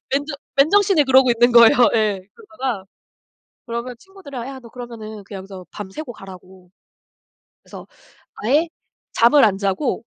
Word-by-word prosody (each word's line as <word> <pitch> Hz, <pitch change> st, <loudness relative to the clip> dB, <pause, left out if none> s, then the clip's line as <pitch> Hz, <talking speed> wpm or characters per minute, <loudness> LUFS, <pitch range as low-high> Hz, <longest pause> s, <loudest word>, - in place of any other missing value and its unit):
맨정 285 Hz, +1 st, -2 dB, 0.2 s
맨정신에 370 Hz, +2 st, +4 dB
그러고 265 Hz, -1 st, +4 dB
있는 240 Hz, +1 st, +3 dB
거예요. 235 Hz, -1 st, +7 dB, 0.2 s
예. 210 Hz, -4 st, 0 dB
그러다가. 265 Hz, -, -5 dB, 0.8 s
그러면 235 Hz, +1 st, -5 dB
친구들이랑 285 Hz, -10 st, -10 dB
"야 270 Hz, -1 st, -9 dB
너 235 Hz, -, -14 dB
그러면은 220 Hz, -4 st, -9 dB
그냥 195 Hz, 0 st, -9 dB
여기서 190 Hz, -1 st, -11 dB
밤새고 215 Hz, +7 st, -8 dB
가라."고. 185 Hz, -2 st, -14 dB, 0.9 s
그래서 -, -, -12 dB, 0.5 s
아예 290 Hz, +10 st, +1 dB, 0.5 s
잠을 240 Hz, +5 st, +5 dB
안 195 Hz, -3 st, +1 dB
자고 200 Hz, +5 st, -2 dB
240 Hz, 320 characters per minute, -20 LUFS, 205-280 Hz, 0.9 s, 거예요